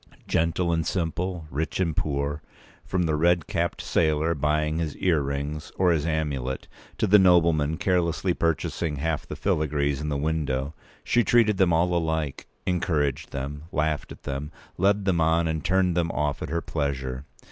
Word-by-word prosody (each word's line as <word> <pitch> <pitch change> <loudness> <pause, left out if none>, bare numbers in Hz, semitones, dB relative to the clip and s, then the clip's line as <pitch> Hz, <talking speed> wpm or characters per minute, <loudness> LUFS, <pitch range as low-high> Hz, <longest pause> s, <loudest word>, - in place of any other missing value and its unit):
Gentle 85 +1 +1
and 80 0 +1
simple, 85 0 -2
rich 75 +7 -2
and 85 -4 0
poor, 70 0 -1 0.4
from 90 -1 -1
the 80 -2 +1
red 85 +1 +3
capped - - -2
sailor 80 0 +2
buying 75 +1 0
his 80 -3 -3
earrings 75 -2 -1
or 90 -1 +4
his 80 -1 +1
amulet, 70 -5 -2 0.3
to - - +1
the 105 +2 +6
nobleman 85 -4 +4
carelessly 90 0 +1
purchasing 80 -1 -1
half 80 +2 -2
the - - -5
filigrees 70 -2 0
in 75 - -2
the 70 - -1
window, 70 -2 -1 0.3
she 120 - +3
treated 110 -4 +4
them 95 -2 +4
all 85 +2 +2
alike—encouraged 80 -1 -1
them, 70 +2 -5
laughed 75 -3 -1
at - - -11
them, 70 +2 -4 0.2
led 100 +2 +2
them 90 -4 +2
on 80 +1 +3
and 80 -1 -2
turned 90 0 +2
them 85 -1 +1
off 75 -2 -1
at - - -4
her 85 +2 -1
pleasure. 70 -4 -3
80 Hz, 160 wpm, -26 LUFS, 75-85 Hz, 0.4 s, the